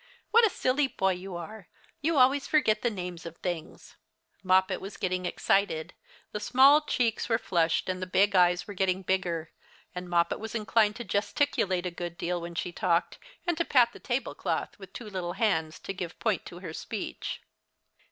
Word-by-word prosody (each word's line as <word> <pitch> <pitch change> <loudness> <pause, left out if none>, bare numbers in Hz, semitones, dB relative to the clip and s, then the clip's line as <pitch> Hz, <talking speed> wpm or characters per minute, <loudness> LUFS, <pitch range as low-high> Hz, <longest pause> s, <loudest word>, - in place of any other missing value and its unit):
"What 460 0 +7
a - - -1
silly 270 -4 +1
boy 190 -6 0
you 185 0 -7
are: 195 +3 -8 0.3
you 315 +1 +1
always 270 +2 +4
forget 220 -8 +3
the 240 - +2
names 180 -5 -6
of 170 0 -8
things." 175 -4 -6 0.4
Moppet 185 0 +3
was 195 +1 -8
getting 185 -1 -1
excited. 180 -3 0 0.4
The 210 - -3
small 265 +7 +6
cheeks 245 -7 0
were 225 - +3
flushed, 170 -7 +1
and 185 0 -2
the 185 - -3
big 200 +2 +3
eyes 180 -1 +4
were 205 - -7
getting 190 0 0
bigger, 175 -4 -1 0.4
and 180 0 -6
Moppet 170 -1 +2
was 220 +2 -6
inclined 215 -1 +2
to 240 - -5
gesticulate 200 -3 0
a 180 - -2
good 175 0 -6
deal 175 0 -2
when 170 0 -7
she 175 - -2
talked, 170 0 0 0.3
and 345 -1 +1
to - - +3
pat 250 -7 +4
the - - -12
table 250 0 -2
*cloth 165 -4 -2
with 195 -2 -11
two 235 - -8
little 185 -4 -4
hands 160 -8 0
to 195 - -5
give 180 -3 -6
point - - -1
to - - -9
her - - -6
speech. - - -5
190 Hz, 190 wpm, -28 LUFS, 175-225 Hz, 0.4 s, What